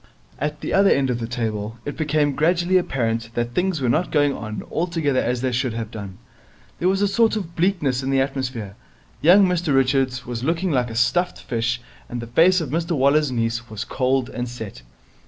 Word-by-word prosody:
At 150 Hz, +1 st, -3 dB
the -, -, -3 dB
other 195 Hz, 0 st, +5 dB
end 135 Hz, -2 st, +2 dB
of 120 Hz, -, -2 dB
the 115 Hz, -, -3 dB
table 110 Hz, -2 st, -3 dB
it 145 Hz, -, -4 dB
became 150 Hz, -2 st, +1 dB
gradually 175 Hz, +4 st, +2 dB
apparent 115 Hz, -8 st, -2 dB
that 120 Hz, 0 st, -2 dB
things 180 Hz, 0 st, 0 dB
were 130 Hz, -, +1 dB
not 155 Hz, +10 st, +1 dB
going 145 Hz, -2 st, +2 dB
on 110 Hz, -3 st, -6 dB
altogether 160 Hz, -5 st, 0 dB
as 125 Hz, 0 st, -1 dB
they 130 Hz, -1 st, 0 dB
should 125 Hz, -1 st, -1 dB
have 115 Hz, -1 st, -5 dB
done. 100 Hz, -5 st, -8 dB, 0.6 s
There 180 Hz, -, +2 dB
was 195 Hz, +1 st, +1 dB
a -, -, +4 dB
sort 220 Hz, +3 st, +2 dB
of 175 Hz, -6 st, -5 dB
bleakness 160 Hz, -8 st, +1 dB
in 135 Hz, -, -3 dB
the 135 Hz, 0 st, +2 dB
atmosphere. 130 Hz, -7 st, -3 dB, 0.5 s
Young 185 Hz, +6 st, +7 dB
Mr 175 Hz, -5 st, +1 dB
Richards 130 Hz, -1 st, +1 dB
was 120 Hz, -1 st, -5 dB
looking 165 Hz, +4 st, 0 dB
like 125 Hz, -4 st, +1 dB
a 115 Hz, -, -7 dB
stuffed 175 Hz, +10 st, +1 dB
fish, 120 Hz, 0 st, -2 dB, 0.3 s
and 120 Hz, -, -4 dB
the 115 Hz, -, -5 dB
face 170 Hz, +10 st, +4 dB
of 145 Hz, -5 st, -4 dB
Mr 170 Hz, +2 st, -1 dB
Waller's 140 Hz, +1 st, +3 dB
niece 115 Hz, 0 st, -2 dB
was 110 Hz, -1 st, -4 dB
cold 130 Hz, -1 st, 0 dB
and 125 Hz, 0 st, -4 dB
set. 110 Hz, -, -8 dB
135 Hz, 205 wpm, -22 LUFS, 120-165 Hz, 0.6 s, Young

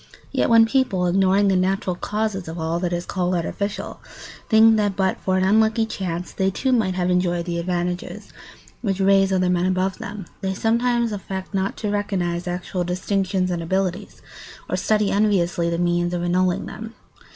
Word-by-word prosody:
Yet -, -, +1 dB
when 230 Hz, -1 st, +7 dB
people, 225 Hz, -7 st, +1 dB
ignoring 195 Hz, +2 st, +3 dB
the 195 Hz, -, +3 dB
natural 185 Hz, 0 st, 0 dB
causes 210 Hz, -1 st, -3 dB
of 165 Hz, +1 st, -6 dB
all 165 Hz, +1 st, -1 dB
that 175 Hz, -1 st, -2 dB
is 175 Hz, 0 st, -2 dB
called 180 Hz, -1 st, -1 dB
artificial, 200 Hz, +4 st, -3 dB, 0.5 s
think 220 Hz, 0 st, +6 dB
that 205 Hz, -2 st, 0 dB
but 190 Hz, -1 st, 0 dB
for 185 Hz, 0 st, 0 dB
an 185 Hz, -, +1 dB
unlucky 220 Hz, +3 st, +3 dB
chance 180 Hz, -5 st, -4 dB
they, 190 Hz, -1 st, 0 dB
too, 260 Hz, +7 st, -1 dB
might 215 Hz, -7 st, +1 dB
have 180 Hz, 0 st, 0 dB
enjoyed 175 Hz, -1 st, +1 dB
the 170 Hz, -1 st, -2 dB
advantages 175 Hz, 0 st, -3 dB, 0.5 s
which 195 Hz, -4 st, -1 dB
raise 195 Hz, 0 st, +4 dB
other 185 Hz, -1 st, +2 dB
men 180 Hz, 0 st, +1 dB
above 185 Hz, +1 st, -1 dB
them, 200 Hz, -2 st, -7 dB, 0.2 s
they 190 Hz, 0 st, -2 dB
sometimes 235 Hz, +2 st, +1 dB
affect 190 Hz, -1 st, -6 dB
not 195 Hz, 0 st, -1 dB
to 210 Hz, -2 st, -2 dB
recognise 180 Hz, -4 st, -2 dB
actual 180 Hz, +1 st, -3 dB
distinctions 185 Hz, +1 st, -1 dB
and 175 Hz, -1 st, -2 dB
abilities, 185 Hz, +1 st, -2 dB, 0.4 s
or -, -, -1 dB
study 210 Hz, -2 st, +1 dB
enviously 180 Hz, -5 st, +1 dB
the 170 Hz, -, -1 dB
means 175 Hz, 0 st, 0 dB
of 175 Hz, -, -2 dB
annulling 180 Hz, 0 st, +1 dB
them. 225 Hz, +1 st, -8 dB
190 Hz, 175 wpm, -22 LUFS, 175-205 Hz, 0.5 s, when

